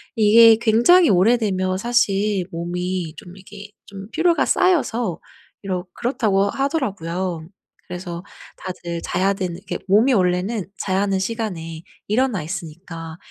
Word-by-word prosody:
이게 225 +1 +7
굉장히 240 +11 +5
오래되면 190 -2 +2
사실 205 -4 +1
"몸이 175 0 -4
좀 175 0 -12
이게 200 +2 -12 0.2
좀 195 -1 -9
피로가 335 +1 +2
쌓여서 245 - +1 0.4
이러 185 -2 -3
그렇다."고 215 -6 0
하더라고요. 190 - -2 0.4
그래서 175 -1 -6 0.4
다들 170 -2 -6
자야 185 +4 0
되는 185 -4 -4
이게 190 - -5
몸이 215 +7 +4
원래는 185 +1 0
자야 190 -1 0
하는 195 -1 0
시간에 185 -7 -4 0.3
일어나 220 -5 +1
있으니까 165 -1 -7
195 Hz, 290 characters per minute, -21 LUFS, 180-225 Hz, 0.4 s, 이게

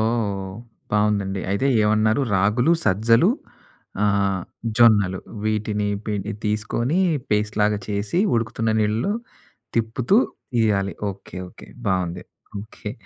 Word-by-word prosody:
ఓహ్! 105 -4 -1 0.4
బాగుందండి. 105 -2 +1
అయితే 100 +7 +1 0.2
ఏమన్నారు 110 +3 +3
రాగులు, 105 - +3
సజ్జలు 115 - +4 0.7
ఆహ్, 100 -2 +1 0.4
జొన్నలు. 105 -6 +5 0.3
వీటిని 105 -1 0 0.2
పె 105 - -1 0.3
తీసుకొని 110 - 0 0.3
పేస్ట్‌లాగా 105 0 +1
చేసి, 100 - -1 0.2
ఉడుకుతున్న 115 -1 0
నీళ్లలో 110 - +1 0.6
తిప్పుతూ 115 - +2 0.4
ఈయాలి. 100 -3 +1 0.2
ఓకె. 95 -1 -9
ఓకె. - - -14 0.2
బాగుంది. 90 -2 -1 0.4
ఓకె. 105 0 -8
105 Hz, 95 wpm, -23 LUFS, 100-115 Hz, 0.7 s, జొన్నలు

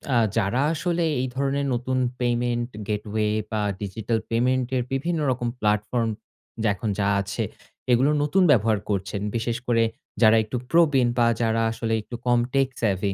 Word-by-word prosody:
আ - - +5 0.2
যারা 115 +5 +1
আসলে 170 +1 -1 0.2
এই 130 - -1
ধরনের 140 +1 0
নতুন 130 +2 -1 0.2
পেমেন্ট 120 0 0 0.2
গেটওয়ে 105 0 -1 0.2
বা 110 -1 0 0.2
ডিজিটাল 110 +3 -2
পেমেন্টের 125 +2 +1
বিভিন্ন 160 +5 -1
রকম 120 -1 -2
প্লাটফর্ম 105 +2 0 0.5
যা 110 - +3
এখন 105 +3 -3
যা 100 - +2
আছে। 100 0 -3 0.5
এগুলো 130 +5 +4
নতুন 185 +6 +3
ব্যবহার 110 -4 +3
করছেন। 100 0 -2
বিশেষ 115 0 -1
করে 115 -1 +3 0.4
যারা 110 0 +7
একটু 110 +4 -4
প্রবীণ 150 -7 +4
বা 120 -1 +4
যারা 115 0 +1
আসলে 115 0 -2
একটু 120 - -8
কম 120 -1 +4
টেক 135 -1 +3
সেভি 100 -2 0
120 Hz, 155 wpm, -24 LUFS, 110-130 Hz, 0.5 s, যারা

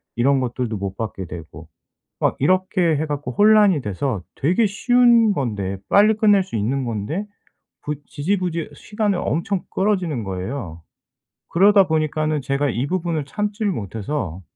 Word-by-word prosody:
이런 135 +3 +3
것들도 120 -3 -2
못 95 0 -4
받게 105 -4 -4
되고 80 -2 -10 0.5
막 - - +2
이렇게 185 0 +2
해 155 +2 -1
갖고 145 -3 -4
혼란이 205 - +5
돼서 105 0 -3
되게 180 - +2
쉬운 235 +1 +4
건데 105 - -2
빨리 210 +2 +5
끝낼 205 -3 +4
수 185 - -6
있는 125 +6 -1
건데 120 - -3 0.6
부 150 0 -3
지지부지 170 0 -2
시간을 210 +1 -2
엄청 175 +4 -1
끌어지는 185 - 0
거예요. 95 - -5 0.7
그러다 195 +1 +5
보니까는 155 -1 0
제가 140 +2 0
이 125 +3 -1
부분을 170 -4 -2
참지를 210 +5 -2
못해서 100 - -4
150 Hz, 300 characters per minute, -21 LUFS, 120-195 Hz, 0.7 s, 혼란이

